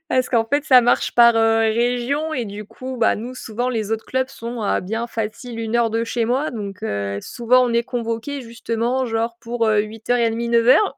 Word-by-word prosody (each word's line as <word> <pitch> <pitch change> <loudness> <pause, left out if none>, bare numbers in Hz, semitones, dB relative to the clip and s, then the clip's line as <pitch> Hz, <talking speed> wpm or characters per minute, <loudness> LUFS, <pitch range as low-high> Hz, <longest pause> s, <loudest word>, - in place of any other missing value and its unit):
Parce 255 -4 +1
qu'en 230 -2 +2
fait 285 +5 0
ça 255 -4 +7
marche 245 +1 +1
par, 235 -1 +7
heu, 225 0 +3
région 245 +7 0
et 245 - -2
du 210 0 -8
coup, 255 +4 -7
bah, 225 - +3
nous 245 +4 -6
souvent, 245 +1 -3
les 220 -3 -3
autres 225 0 -2
clubs 260 0 -1
sont 235 -1 -7
à 205 - 0
bien 225 +5 -3
facile, 230 +1 -5
1 225 0 -1
heure 235 -1 +3
de 230 +1 0
chez 230 0 -1
moi 265 +6 0
donc 200 -5 -7
heu, 100 0 -2
souvent 250 +1 +2
on 240 - -1
est 235 0 +2
convoqués 240 +3 -4
justement, 235 +2 -2
genre 230 +1 -2
pour, 235 -1 -1
heu, 215 -1 +3
08:30-09:00, 235 - +2
235 Hz, 200 wpm, -21 LUFS, 225-245 Hz, -, ça